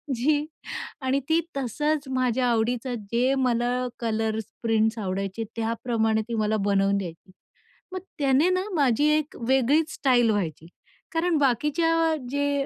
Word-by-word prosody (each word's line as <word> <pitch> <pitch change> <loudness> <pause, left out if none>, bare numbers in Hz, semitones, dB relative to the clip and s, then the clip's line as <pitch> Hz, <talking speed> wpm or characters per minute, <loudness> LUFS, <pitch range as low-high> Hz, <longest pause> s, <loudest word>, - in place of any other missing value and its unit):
जी 290 +5 +1 0.6
आणि 260 +1 +1
ती 320 +1 +4 0.2
तसंच 295 +3 -1
माझ्या 255 -1 +1
आवडीचं 240 +2 0 0.2
जे 250 +3 +2
मला 250 -1 0
कलर्स 220 -1 -1 0.2
प्रिंट्स 220 0 +2
आवडायचे, 195 +2 -3
त्याप्रमाणे 225 -1 0
ती 235 - -5
मला 215 0 +1
बनवून 200 0 +2
द्यायची. 180 -1 -7 0.6
मग 370 - -2 0.2
त्याने 280 +4 +3
ना 370 0 +1
माझी 280 -2 +3
एक 305 -1 -4
वेगळीच 275 +5 +2
स्टाईल 245 -4 +3
व्हायची, 165 -5 -3 0.5
कारण 335 0 +1
बाकीच्या 320 +5 +2
जे 285 0 0
250 Hz, 130 wpm, -25 LUFS, 220-285 Hz, 0.6 s, ती